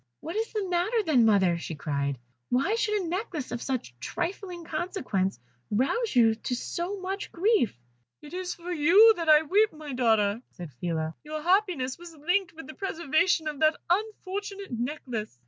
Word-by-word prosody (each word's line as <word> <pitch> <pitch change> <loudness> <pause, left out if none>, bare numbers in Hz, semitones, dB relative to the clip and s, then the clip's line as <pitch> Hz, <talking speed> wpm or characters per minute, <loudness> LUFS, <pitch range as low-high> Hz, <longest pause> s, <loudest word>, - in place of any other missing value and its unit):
"What 330 - -6
is 450 +1 -1
the 420 -4 -2
matter, 370 +6 +1
then, 250 -8 +4
mother?" 190 -5 +3
she 165 - -5
cried. 140 -2 -2 0.3
"Why 270 - +2
should 425 -3 +1
a - - -4
necklace 345 - -3
of 240 -1 -3
such 255 - -3
trifling 360 - -4
consequence 285 - -2 0.3
rouse 275 - 0
you 225 -2 +6
to 235 +3 -3
so 350 +10 -4
much 385 +2 -4
grief?" 360 - +2 0.4
"It 295 - -11
is 365 0 -3
for 350 +1 -7
you 355 +8 +7
I 315 -2 +5
weep, 415 +7 +3
my 305 -2 -8
daughter," 220 -3 +2
said 170 -5 -9
Phila. 160 +3 -2
"Your 305 0 -5
happiness 350 -8 +1
was 345 -1 -11
linked 355 +5 0
with 325 -3 -10
the 310 - -9
preservation 340 -2 +1
of 300 -2 -4
that 310 0 +3
unfortunate 400 -1 -2
necklace." 240 - -4
315 Hz, 165 wpm, -28 LUFS, 240-380 Hz, 0.4 s, you